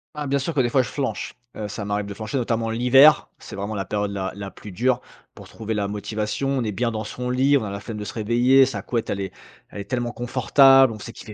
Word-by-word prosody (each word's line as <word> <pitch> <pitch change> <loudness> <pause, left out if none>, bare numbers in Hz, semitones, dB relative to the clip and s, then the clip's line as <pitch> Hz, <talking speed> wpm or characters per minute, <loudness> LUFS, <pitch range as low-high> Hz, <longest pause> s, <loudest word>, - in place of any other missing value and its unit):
Bah, 150 -1 -4
bien 140 +1 +1
sûr 150 +5 -3
que 145 - -1
des 125 - +3
fois, 130 +2 +3
je - - -7
flanche. 140 -2 -4 0.2
Heu, 105 - -4
ça 105 0 -5
m'arrive 100 0 -2
de 100 - -6
flancher, 110 +5 -4
notamment 115 -2 -1
l'hiver. 135 +6 +5
C'est - - -10
vraiment 100 +2 -4
la 95 -1 -3
période 105 +1 -2
la 95 -1 -3
la 100 -1 -7
plus 105 - -11
dure 125 +6 +1 0.4
pour - - -12
trouver 110 0 -5
la 105 -2 -1
motivation. 105 +5 -3
On 135 -2 0
est 105 - -1
bien 120 +3 -1
dans 110 -1 -4
son 125 +3 -5
lit. 135 +3 +3
On 130 - -2
a 105 - -5
la 100 - -5
flemme 110 +1 -7
de 105 - -5
se 100 - -7
réveiller. 120 +4 +4
Sa 135 - -4
couette, 115 -2 -3
elle 100 - -2
est 95 -1 -4 0.4
elle - - -9
est 100 - -6
tellement 120 -1 -1
confortable. 135 +2 +5
On 110 - -8
sait 115 +2 -9
qu'il - - -12
fait 105 - -8
115 Hz, 275 wpm, -23 LUFS, 105-130 Hz, 0.4 s, l'hiver